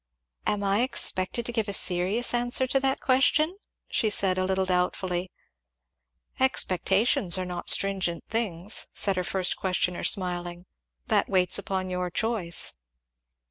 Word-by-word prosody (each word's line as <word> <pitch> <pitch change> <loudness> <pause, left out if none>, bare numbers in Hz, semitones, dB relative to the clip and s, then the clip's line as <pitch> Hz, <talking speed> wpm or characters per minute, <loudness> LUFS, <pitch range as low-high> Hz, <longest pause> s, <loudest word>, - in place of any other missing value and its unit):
"Am 205 -1 -1
I 200 +2 +1
expected 235 -3 +2
to 240 - -1
give 225 -3 -2
a 200 - -3
serious 190 +7 +1
answer 245 +2 +1
to 270 +1 0
that 270 0 -1
question?" 290 +6 +2 0.3
she 220 - 0
said 190 -2 +2
a 185 - 0
little 190 0 0
doubtfully. 180 0 -2 1.1
"Expectations 190 -5 +2
are 185 - -3
not 175 -1 -6
stringent 190 -3 +1
things," 210 -3 -2
said 195 -2 +2
her 180 - -1
first 185 0 0
questioner 180 -1 -1
smiling. 175 -1 -1 0.4
"That - - +1
waits 185 0 +2
upon 190 -1 -4
your 180 0 -3
choice." 180 -2 0
190 Hz, 140 wpm, -26 LUFS, 180-225 Hz, 1.1 s, expected